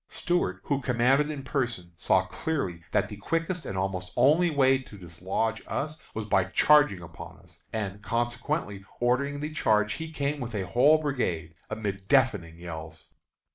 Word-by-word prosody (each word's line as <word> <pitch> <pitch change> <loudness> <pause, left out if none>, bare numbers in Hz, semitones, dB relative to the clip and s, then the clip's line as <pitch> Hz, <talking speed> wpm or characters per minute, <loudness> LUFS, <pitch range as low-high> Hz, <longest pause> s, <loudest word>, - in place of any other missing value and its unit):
Stuart, 95 - -1
who 140 -1 -1
commanded 130 +4 +3
in 145 -3 -5
person, 120 - -2
saw - - +2
clearly 115 - -3
that - - +2
the 105 - -8
quickest 165 - -2
and 95 - -4
almost 95 -1 -2
only 155 +8 +5
way 135 -3 +4
to 120 -5 -12
dislodge 95 +6 -2
us 155 +2 -3 0.2
was 110 -1 -3
by 95 -3 +2
charging 145 0 +4
upon 80 -1 -10
us, - - -19
and, 105 -2 -4
consequently 120 -1 -2 0.2
ordering 140 +4 +1
the 150 +1 -4
charge, 105 -6 +2
he 160 +4 -6
came 145 -1 -2
with 120 -3 -5
a 95 -2 -1
whole 130 +10 +5
brigade 95 - -2 0.2
amid 100 -3 -4
deafening 95 -12 +2
yells. 80 -2 -9
120 Hz, 160 wpm, -28 LUFS, 95-145 Hz, 0.2 s, only